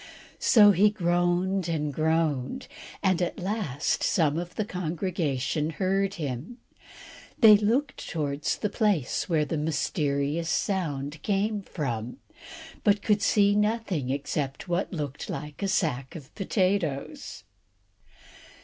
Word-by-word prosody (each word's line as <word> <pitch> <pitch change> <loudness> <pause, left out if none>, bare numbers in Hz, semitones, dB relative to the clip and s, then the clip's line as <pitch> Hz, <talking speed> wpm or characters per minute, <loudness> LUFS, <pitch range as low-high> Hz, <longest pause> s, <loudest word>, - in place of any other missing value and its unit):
So 210 -3 +7
he 200 +3 +5
groaned 175 -1 0
and 150 -3 -1
groaned, 160 - 0 0.4
and 185 -2 +2
at 175 - -1
last 175 - -1
some 160 -2 +2
of 175 0 -7
the 215 - -1
congregation 165 -5 -2
heard 195 +3 0
him. 150 - -5 0.8
They 220 -3 +9
looked 235 +8 0
towards 145 -3 -2
the 210 - -1
place 205 - 0
where 155 -3 +2
the 155 +1 -2
mysterious 150 0 -1
sound 150 -5 -2
came 205 +3 0
from, 125 - -4 0.7
but 205 0 +3
could 210 -1 +2
see 205 -1 +4
nothing 210 - 0
except 140 +2 -3
what 175 +2 -1
looked 150 -5 -5
like 150 -2 -6
a 200 - 0
sack 135 -8 -1
of 145 -5 -10
potatoes. 190 - -1
170 Hz, 120 wpm, -27 LUFS, 150-200 Hz, 0.8 s, They